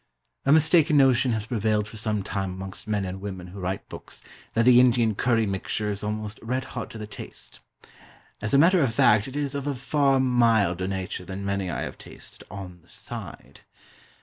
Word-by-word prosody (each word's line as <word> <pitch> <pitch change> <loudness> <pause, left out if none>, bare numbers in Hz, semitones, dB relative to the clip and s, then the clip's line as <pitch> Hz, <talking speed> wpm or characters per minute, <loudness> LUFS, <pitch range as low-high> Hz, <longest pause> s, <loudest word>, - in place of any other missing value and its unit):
A - - +5
mistaken 160 0 +5
notion 130 -2 +4
has 110 -1 -2
prevailed 110 -2 0
for 110 - -11
some 105 -2 -1
time 95 0 -3
amongst 95 +2 -8
men 105 -2 0
and 95 +1 -6
women 95 -3 -6
who 100 +2 -9
write 95 +1 -3
books, - - -9 0.3
that 115 0 +3
the 125 -1 +8
Indian 120 -3 +4
curry 115 +1 +2
mixture 105 +2 -2
is 100 - -5
almost 105 0 -4
red 125 +3 -2
hot 120 -4 -5
to - - -9
the 110 - -6
taste. 105 -1 -9 0.8
As 105 - -2
a 140 - +5
matter 170 +4 +5
of 120 -5 +1
fact 105 0 +4
it 135 - -8
is 145 -1 -2
of 140 0 -3
a 145 - -1
far 135 +1 +2
milder 115 -8 +2
nature 95 -1 -4
than 95 +2 -6
many 100 -2 -1
I - - -3
have - - -6
tasted - - -11
"on 95 -3 -8
this - - -16
side." - - -9
110 Hz, 200 wpm, -25 LUFS, 100-125 Hz, 0.8 s, the